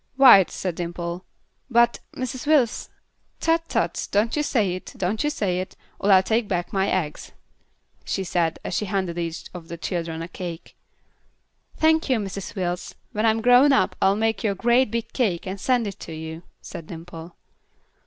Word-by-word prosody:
"White," 250 -9 +8
said 185 -2 -3
Dimple. 170 +1 -5 0.4
"But 235 0 +4 0.2
Mrs. 255 +2 -4
Wills 280 -7 +2 0.3
" - - -44
"Tut! 330 0 +1
Tut! - - -1
Don't 210 +3 +2
you 300 - +1
say 220 -10 +1
it; 185 - -8
don't 195 +6 -1
you 295 - +2
say 190 -10 -1
it, 185 - -6 0.2
or 200 - +2
I'll 190 -1 +7
take 225 +2 +1
back 175 -3 -2
my 195 0 +1
eggs," 160 -5 -2 0.7
she 195 - -2
said, 170 -2 0
as - - -4
she 210 - 0
handed 185 -3 -2
each 165 -1 -4
of 175 -2 -9
the 170 0 -7
children 165 -1 -3
a - - -6
cake. 175 -1 -7 1.0
"Thank 315 -1 +3
you, 255 - +3
Mrs. 200 0 -5
Wills. 180 -2 -3 0.2
When 215 +2 +1
I'm 220 0 +2
grown 250 +4 +6
up 190 - +2
I'll 195 +1 +4
make 225 +2 0
you 215 - +2
a - - -10
great 240 +4 +3
big 230 0 -4
cake 200 -10 0
and 190 0 -5
send 250 -3 +2
it 200 -2 -6
to 165 - -8
you," 160 +1 -7 0.2
said 160 - -9
Dimple. 165 0 -9
195 Hz, 185 wpm, -24 LUFS, 175-235 Hz, 1.0 s, White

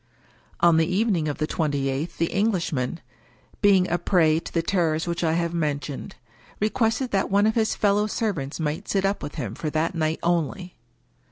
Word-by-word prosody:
On 170 -1 +5
the 160 0 +3
evening 185 -4 +1
of 145 - -2
the 155 - 0
twenty 145 -4 -1
eighth 135 +5 -3
the 165 - 0
Englishman, 175 - 0 0.6
being 195 -3 +5
a 175 - 0
prey 160 -4 +3
to - - -9
the 165 - 0
terrors 165 -3 +1
which 170 0 -2
I 160 -1 +2
have 170 0 0
mentioned, 150 -3 -3 0.4
re 215 +1 +1
quested 230 +2 0
that 195 -1 +1
one 200 +1 +3
of 220 - +3
his 220 -1 +1
fellow 205 0 +2
servants 180 -11 -2
might 155 -1 -3
sit 195 -1 +1
up 195 +1 0
with 145 - -6
him 110 -4 -4
for 155 - -4
that 155 +3 0
night 160 -1 0
only. 175 +2 -1
170 Hz, 190 wpm, -24 LUFS, 155-200 Hz, 0.6 s, On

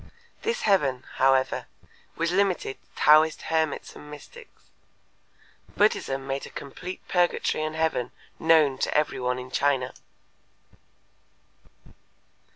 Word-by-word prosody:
This 470 +2 -1
heaven, 135 -10 +2
however, 130 0 +2 0.5
was 165 +1 0
limited 185 -7 0
to - - -35 0.2
Taoist 155 +1 +6
hermits 160 -2 -1
and 150 - -12
mystics. 425 - -14 1.1
Buddhism 135 -10 +1
made 135 0 -3
a - - -12
complete 180 +6 -8
purgatory 175 -3 +1
and 155 0 -3
heaven 160 -6 0 0.3
known 155 -5 +4
to - - 0
every 150 0 0
one 125 0 -1
in 125 0 -8
China. 135 -3 +1
150 Hz, 110 wpm, -26 LUFS, 135-170 Hz, 1.1 s, Taoist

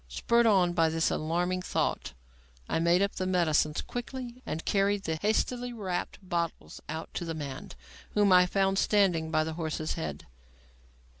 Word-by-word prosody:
Spurred 235 - +2
on 185 -5 +4
by 165 -2 +3
this 160 0 +1
alarming 175 +4 -1
thought, 180 - -2 0.5
I - - 0
made 170 +3 +3
up 200 - -2
the 185 - -1
medicines 155 -4 +2
quickly 245 0 -6
and 160 - -4
carried 200 0 +1
the 160 -3 -2
hastily 245 +6 0
wrapped 190 -6 -3
bottles 170 - -3
out 160 +1 -5
to - - -3
the 165 -1 -4
man, 140 -4 -6 0.5
whom 205 -2 +5
I 180 0 +6
found 195 +1 +1
standing 180 -6 +2
by 155 -1 +2
the 160 0 -4
horse's 155 -1 -3
head. 75 -2 -5
175 Hz, 160 wpm, -29 LUFS, 160-200 Hz, 0.5 s, I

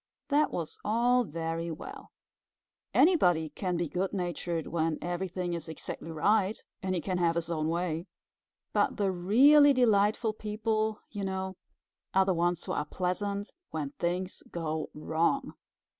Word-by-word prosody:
That 295 +1 +3
was 165 -3 -4
all 245 +3 +3
very 165 0 -3
well. 160 - -8 0.8
Anybody 175 - +4
can 180 0 -2
be 170 0 -1
good 185 +5 -2
natured 175 -3 -2
when 160 -2 0
everything 175 0 -3
is 170 -1 -5
exactly 160 +1 -6
right 200 +6 +2 0.2
and 185 0 -1
he 175 - -1
can 185 +2 -2
have 170 -1 +2
his 170 0 -2
own 155 -2 0
way. 170 0 -1 0.7
But - - +2
the 200 -3 +1
really 275 +11 +6
delightful 215 -2 +3
people, 215 0 -1
you 205 -2 -4
know, 190 0 -3 0.6
are 190 0 +5
the 190 - +2
ones 175 0 0
who - - -4
are - - 0
pleasant 200 +5 -2 0.2
when 150 -3 -3
things 180 +2 -2
go 160 -2 -3
wrong. 165 - 0
180 Hz, 145 wpm, -30 LUFS, 165-210 Hz, 0.8 s, really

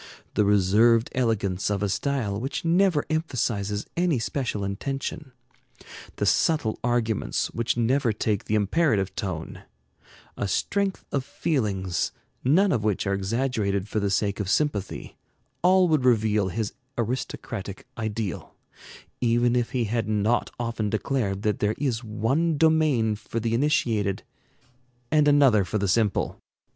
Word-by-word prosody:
The 105 - +2
reserved 105 +4 +4
elegance 105 -7 0
of 100 -1 -1
a - - +2
style 105 -2 -1
which 135 +6 -4
never 170 -2 +3
emphasizes 115 -10 -1
any 175 -4 +2
special 115 -3 -2
intention; 135 +7 -4 0.8
the - - -1
subtle 150 -10 +2
arguments 120 -3 0
which 115 0 -1
never 120 +1 +2
take 105 -1 -1
the 110 - 0
imperative 105 - +1
tone; 90 -5 -5 0.7
a 100 - -2
strength 195 - -1
of 140 - 0
feelings, 100 - -1 0.3
none 185 +10 +4
of 115 -6 0
which 105 -2 0
are 100 - 0
exaggerated 100 -1 -1
for 110 - -1
the 100 -1 0
sake 100 +1 0
of 100 -2 -2
sympathy, 105 -6 -1 0.4
all 185 +1 +5
would 155 -5 +2
reveal 110 -5 +3
his 105 +2 -3 0.2
aristocratic 115 -4 -4
ideal, 110 -3 -4 0.6
even 120 0 +2
if 120 -1 +1
he 125 -2 0
had 115 0 -1
not 110 +3 +1
often 115 -3 -2
declared 105 -3 -1
that 105 -1 0
there 105 +1 +1
is 125 -5 -1
one 135 +9 0
domain 150 -8 +3
for 110 +2 -5
the 115 0 -1
initiated 115 -7 +1 0.9
and 150 -1 +4
another 140 -8 +5
for 105 - -2
the 100 -1 0
simple. 105 +1 +1
115 Hz, 135 wpm, -25 LUFS, 105-135 Hz, 0.9 s, all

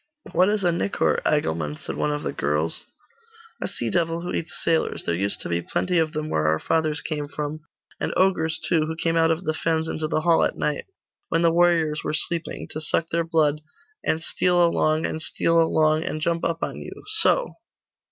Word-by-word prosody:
'What 185 +2 +4
is 210 -1 0
a 175 - +4
nicor, 175 +4 0
Agilmund?' 80 - 0
asked - - -6
one - - 0
of 150 0 -3
the - - -2
girls. 75 +3 -1 0.8
'A - - -1
sea - - -3
devil 165 -1 0
who 175 +1 -4
eats 160 - -3
sailors. 165 -1 +1
There - - -1
used 100 +4 -1
to - - -5
be 85 0 0
plenty 180 - 0
of 160 -1 +1
them 155 -1 -3
where 75 - 0
our 80 0 +3
fathers 155 - 0
came 150 -2 -3
from, 150 +1 -4 0.4
and - - -1
ogres 165 -4 +2
too, 160 -3 +2
who 160 - -3
came 165 0 0
out 165 0 +4
of 165 +3 0
the 155 - 0
fens 160 0 0
into 155 -1 -2
the 155 - 0
hall 165 0 +4
at - - 0
night, 150 - -1 0.4
when 165 - +1
the 165 - +5
warriors 165 -3 +3
were - - -1
sleeping, 170 +1 -2
to 155 - -4
suck 165 +1 0
their 170 0 +1
blood, 155 -3 +1 0.4
and 160 +1 0
steal 175 0 +3
along, 155 -1 +2
and 160 - -3
steal 165 +1 +2
along, 155 -1 +3
and 155 - -3
jump 165 +2 0
upon 165 0 -2
you - - -9 0.2
so! - - +3
160 Hz, 205 wpm, -24 LUFS, 150-170 Hz, 0.8 s, the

